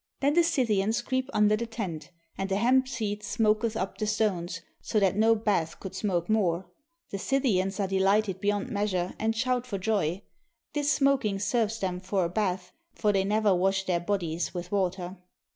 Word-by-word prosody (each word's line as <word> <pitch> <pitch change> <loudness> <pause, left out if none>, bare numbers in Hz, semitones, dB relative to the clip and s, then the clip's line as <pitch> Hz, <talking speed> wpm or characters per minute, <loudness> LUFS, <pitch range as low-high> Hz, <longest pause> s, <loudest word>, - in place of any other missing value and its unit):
Then 280 +1 +2
the 345 - +5
Scythians 225 -10 +1
creep 260 0 -1
under 210 -2 +4
the 235 +2 -3
tent; 185 -10 -5 0.3
and 195 0 -3
the 190 - +1
hemp 255 +5 +3
seed 215 -5 -3
smoketh 220 0 +1
upon 190 - -2
the 215 - -1
stones, 185 -5 -1 0.2
so 215 - 0
that 195 -2 +2
no 225 +2 +4
bath 200 -7 0
could 190 -1 -7
smoke 185 -3 -1
more. 190 -5 +1 0.5
The 200 - -3
Scythians 200 -7 +1
are 195 - +1
delighted 195 0 +2
beyond 205 +4 0
meas 205 -2 -1
ure, 180 0 -1
and 225 +1 0
shout 250 +1 0
for 200 - -3
joy. 195 -2 0 0.5
This 295 0 +1
smoking 270 -9 +2
serves 225 +2 0
them 185 -3 -2
for 190 0 0
a - - -2
bath, 185 -1 -1 0.2
for 210 -1 +1
they 195 -1 +2
never 210 0 +2
wash 190 +2 +1
their 180 -2 +1
bodies 175 -2 -2
with 175 0 -5
water. 185 -1 -1
205 Hz, 185 wpm, -28 LUFS, 185-225 Hz, 0.5 s, the